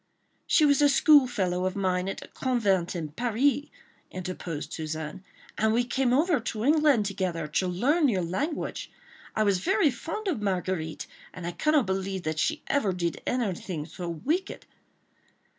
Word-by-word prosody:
"She 310 - +5
was 285 -1 +4
a 290 - +6
school 285 -1 +6
fellow 185 -6 -1
of 185 - -4
mine 185 -1 0
at - - -4
the - - -10
convent 200 -9 0
in 160 -3 -3
Paris," 245 - +1 0.4
interposed 180 -4 -5
Suzanne, 155 +2 -5 0.4
"and 220 0 +3
we 240 +2 +3
came 250 +1 0
over 300 +3 +3
to 225 -1 -4
England 295 -7 +4
together 185 -5 -2
to 170 +5 0
learn 275 - +2
your 190 -6 0
language. 280 - -3 0.4
I 215 - +2
was 200 -3 +2
very 375 - +2
fond 395 - -5
of 310 - -1
Marguerite, 185 -5 -2 0.3
and 180 -2 -7
I 175 - -2
cannot 295 - +2
believe 190 0 -2
that 155 -1 -2
she - - 0
ever 215 -10 +1
did 170 -3 -2
anything 190 -9 -2
so 175 +1 -6
wicked." 310 - -2
200 Hz, 160 wpm, -27 LUFS, 180-275 Hz, 0.4 s, a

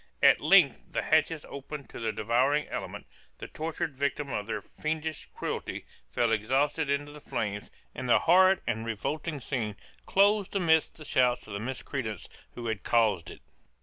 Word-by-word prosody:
At - - +7
length - - +5
the - - 0
hatches 155 0 +2
opened 140 +1 -8
to - - -8
the 115 -1 -1
devouring 125 +8 +1
element, - - -5 0.3
the - - -7
tortured 160 -1 -4
victim 140 +1 -2
of 105 -2 -3
their 105 -3 -3
fiendish 155 0 -4
cruelty - - -4 0.2
fell 120 -2 +1
exhausted 135 +8 +1
into 145 +1 -1
the 150 0 -12
flames, 105 -5 -3 0.2
and 130 0 -5
the - - +7
horrid 185 +2 +5
and 110 +1 -1
revolting 145 +8 -3
scene 115 -5 -3 0.3
closed 200 0 +3
amidst 160 -4 +2
the 155 - -11
shouts 125 -3 +2
of 105 - -9
the 100 - -3
miscreants 120 -3 -4 0.3
who 120 - -6
had 110 -5 -2
caused 110 -7 +2
it. - - -11
135 Hz, 165 wpm, -29 LUFS, 115-155 Hz, 0.3 s, At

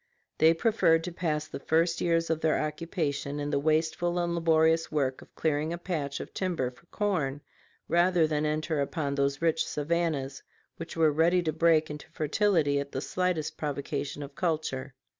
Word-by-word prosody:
They 160 +1 +6
preferred 165 -5 +3
to 180 - -4
pass 155 -3 -2
the 140 - -7
first 165 +3 +1
years 165 -1 +1
of 160 0 -1
their 160 -1 +2
occupation 150 -2 -2
in 145 0 -3
the 140 - +1
wasteful 160 +3 +1
and 175 -1 0
laborious 165 -1 +3
work 135 -4 0
of - - -17
clearing 155 0 0
a 170 - -3
patch 160 -6 -3
of - - -8
timber 170 -10 -1
for 125 +7 -23
corn, 155 -11 -1 0.5
rather 175 -1 +3
than 150 -1 0
enter 155 0 0
upon 140 0 -2
those 140 +1 0
rich 165 -1 +2
savannas 150 -3 -2 0.4
which 165 0 -7
were 160 -2 +4
ready 170 +4 +3
to 155 -2 -1
break 160 -1 +3
into 150 - -9
fertility 155 -3 +1
at 140 0 -5
the - - -1
slightest 180 0 -1
provocation 145 -1 -3
of 140 0 -9
culture. 140 -5 -2
160 Hz, 175 wpm, -28 LUFS, 145-170 Hz, 0.5 s, They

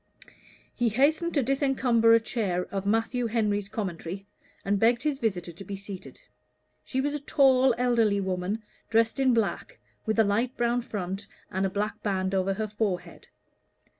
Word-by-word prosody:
He 240 -2 +1
hastened 310 +9 +2
to 280 - +3
disencumber 255 -3 +3
a - - +5
chair 200 -6 -1
of 195 0 -3
Matthew 225 +3 +1
Henry's 210 -3 0
Commentary, 190 -2 -5 0.4
and 200 0 +1
begged 235 +3 +3
his 295 -3 0
visitor 185 -7 -1
to 170 +4 -11
be 200 - -6
seated. 195 -1 -9 0.6
She 265 - -3
was 290 +1 -1
a 295 - -2
tall 265 -3 +4
elderly 230 -5 +2
woman, 190 +3 -2 0.3
dressed 225 +3 +2
in 265 -1 +4
black, 230 - -1 0.3
with 220 - 0
a 225 - +6
light 225 +5 0
brown 240 +1 +1
front 195 -4 -5 0.2
and 190 +1 0
a - - -3
black 205 +2 -3
band 190 -2 -1
over 190 0 +1
her 215 +1 -2
forehead. 210 -3 -3
220 Hz, 165 wpm, -27 LUFS, 195-245 Hz, 0.6 s, a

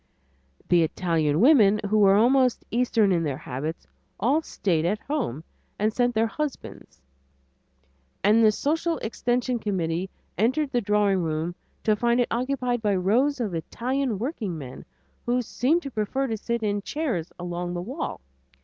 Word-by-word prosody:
The 175 -1 +4
Italian 160 -2 +1
women, 220 -7 +6
who 215 +1 +2
were 195 -1 +6
almost 250 +3 +3
eastern 230 -4 +2
in 175 -2 +2
their 145 -5 -2
habits, 150 +5 -5 0.3
all 275 +8 +2
stayed 175 - -1
at 185 +5 +1
home 250 - -3 0.3
and 215 +1 +1
sent 245 -1 +1
their 220 +1 +3
husbands, 290 - -6 1.2
and 215 +3 +5
the 215 - +6
social 325 +8 -1
extension 245 +2 -1
committee 185 -3 -2 0.3
entered 265 +6 +1
the 245 -3 +1
drawing 205 -2 +2
room 160 +1 -2 0.3
to 215 - +3
find 235 +3 +1
it 245 - +1
occupied 245 0 -1
by 205 -2 +1
rows 245 +10 +2
of 215 -6 -2
Italian 245 - -2
workingmen, 190 - -5 0.4
who 245 +1 +1
seemed 290 +9 +1
to 275 - -6
prefer 235 +5 -1
to 225 -4 -2
sit 235 +2 -3
in 205 -1 0
chairs 235 - -3
along 175 0 -4
the - - -2
wall. 260 - -5
220 Hz, 150 wpm, -25 LUFS, 180-250 Hz, 1.2 s, women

